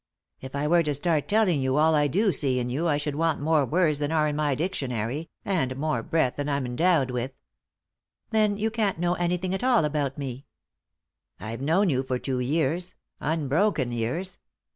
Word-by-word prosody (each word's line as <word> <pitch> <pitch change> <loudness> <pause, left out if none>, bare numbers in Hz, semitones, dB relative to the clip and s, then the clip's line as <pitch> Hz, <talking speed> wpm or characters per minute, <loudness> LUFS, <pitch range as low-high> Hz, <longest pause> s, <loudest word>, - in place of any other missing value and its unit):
" - - -47
If 130 +1 -8
I 140 +1 -1
were 170 +3 +4
to 150 -3 -1
start 155 0 0
telling 205 -9 +2
you 130 +1 +1
all 160 +1 +4
I 150 -1 +3
do 195 - +2
see 135 -3 +2
in 125 0 -2
you 155 +7 -1
I 145 -3 +2
should 145 0 -3
want 160 +1 0
more 150 0 +2
words 155 -2 +2
than 145 +1 -1
are 155 -1 +2
in 150 - -2
my 150 -2 +1
dictionary, 135 - -3 0.2
and 160 -10 0
more 140 -5 -1
breath 160 -2 0
than 145 0 -2
I'm 140 -2 -1
endowed 135 +1 +2
with." 125 +2 -3 0.5
" - - -58
Then 215 -2 +2
you 220 +2 -1
can't 215 -5 0
know 175 +1 +1
anything 180 +1 -1
at 190 - -3
all 245 -9 +4
about 145 -2 -1
me." 135 -1 -6 0.4
" - - -61
I've 110 +5 -6
known 175 +8 +2
you 130 -1 +1
for 130 -1 -2
two 130 0 -3
years; 160 +7 -1 0.2
unbroken 155 - 0
years. 125 +11 -3
150 Hz, 205 wpm, -26 LUFS, 135-175 Hz, 0.5 s, were